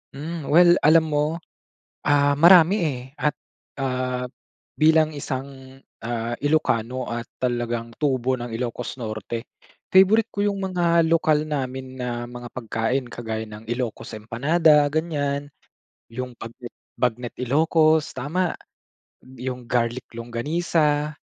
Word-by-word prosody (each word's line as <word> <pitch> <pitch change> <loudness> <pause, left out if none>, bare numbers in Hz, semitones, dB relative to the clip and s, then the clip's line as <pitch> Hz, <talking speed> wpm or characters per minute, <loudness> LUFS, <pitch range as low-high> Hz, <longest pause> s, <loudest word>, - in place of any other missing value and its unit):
Hmm, 155 +1 -6
well 175 +3 +6
alam 160 +1 +6
mo, 150 +2 +1 0.7
ah, 145 -1 +3
marami 175 +4 +7
eh, 135 -5 -2 0.2
at, 150 - +1 0.5
ah, 125 -1 -2 0.5
bilang 155 -1 +4
isang, 135 -1 -7 0.2
ah, 120 0 -3
Ilocano 130 -5 0
at 120 0 -3 0.2
talagang 120 -2 -2
tubo 130 -3 0
ng 120 -1 -6
Ilocos 125 +2 -4
Norte. 110 +1 -5 0.4
Favorite 195 +4 +5
ko 205 - -2
yung 200 -1 0
mga 170 -3 +2
lokal 155 -2 +2
namin 130 -2 -4
na 120 -1 -4
mga 120 0 -9
pagkain. 120 +2 -2
Kagaya 110 -2 -5
ng 105 +1 -10
Ilocos 120 0 -4
empanada, 145 +8 +3
ganyan. 145 -3 -1 0.6
Yung 125 +1 -6
bagnet 120 +1 -9 0.2
bagnet 120 0 -1
Ilocos 155 +4 +3
tama, 165 +7 -1 0.6
yong 125 -1 -7
garlic 120 0 -1
longganisa, 150 +5 0
130 Hz, 115 wpm, -23 LUFS, 120-155 Hz, 0.7 s, marami